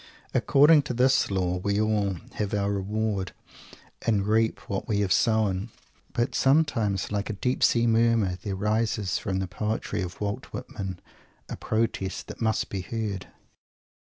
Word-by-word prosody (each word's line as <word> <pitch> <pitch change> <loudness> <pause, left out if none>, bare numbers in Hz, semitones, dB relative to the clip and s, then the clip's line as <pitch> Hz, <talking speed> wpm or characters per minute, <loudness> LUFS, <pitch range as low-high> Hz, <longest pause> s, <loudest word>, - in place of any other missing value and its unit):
According 145 +4 +6
to 125 - -2
this 130 +2 +3
Law, 90 -2 0
we 100 +2 0
all 105 -3 +1 0.2
"have 105 0 -2
our 100 0 0
reward" 100 -1 -2 0.7
and 105 -4 +1
reap 110 +1 +1
what 100 - -3
we 105 -2 +1
have 95 -4 +2
sown. 110 -2 +1 0.4
But 120 - 0
sometimes, 135 -10 +2
like 105 0 -2
a - - -1
deep 125 +5 -1
sea 120 0 +4
murmur, 115 -5 +2
there 100 0 -3
rises 105 -1 0
from 95 -2 -2
the 95 - -1
poetry 105 +3 -2
of 90 -1 -6
Walt 105 0 -3
Whitman 95 -2 -6 0.5
a - - -4
Protest 110 -4 -2
that - - -9
must 110 -1 0
be 95 - -3
heard! 105 -1 -4
105 Hz, 150 wpm, -26 LUFS, 95-115 Hz, 0.7 s, According